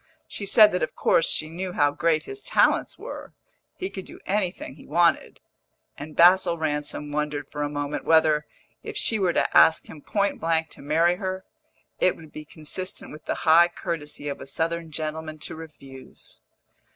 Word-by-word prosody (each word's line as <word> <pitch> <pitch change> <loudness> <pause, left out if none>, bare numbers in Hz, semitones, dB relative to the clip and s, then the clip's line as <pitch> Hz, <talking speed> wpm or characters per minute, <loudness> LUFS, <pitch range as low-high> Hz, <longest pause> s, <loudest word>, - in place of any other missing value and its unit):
She 200 - -5
said 210 +1 +7
that 180 - -1
of - - -2
course 165 - +2
she 155 - +1
knew 180 +3 -5
how 145 -3 +3
great 160 +1 +1
his 405 0 -7
talents - - +2
were - - -9 0.4
he 375 - -3
could 190 - -6
do - - -12
anything 190 -7 -2
he 145 - -16
wanted; 170 -1 +2 0.6
and 150 +1 -9
Basil 175 0 +5
Ransom 150 -1 -3
wondered 150 -1 -2
for 145 - -5
a 145 - -1
moment 145 0 -3
whether, 155 -2 +3 0.3
if 435 -1 -7
she 225 - +1
were 180 -3 +1
to - - 0
ask 160 - +6
him 150 - -12
point 200 +4 -1
blank 160 -1 0
to - - -12
marry 165 +5 +2
her, 190 0 -4 0.5
it 185 - +3
would 160 -2 -14
be 155 - -9
consistent 165 +5 -6
with 150 0 -12
the - - -1
high 170 +2 +7
courtesy 160 -5 -5
of 140 - -5
a - - -9
Southern 165 +2 -2
gentleman 155 0 -5
to - - -7
refuse. 140 -5 -10
160 Hz, 180 wpm, -25 LUFS, 150-180 Hz, 0.6 s, said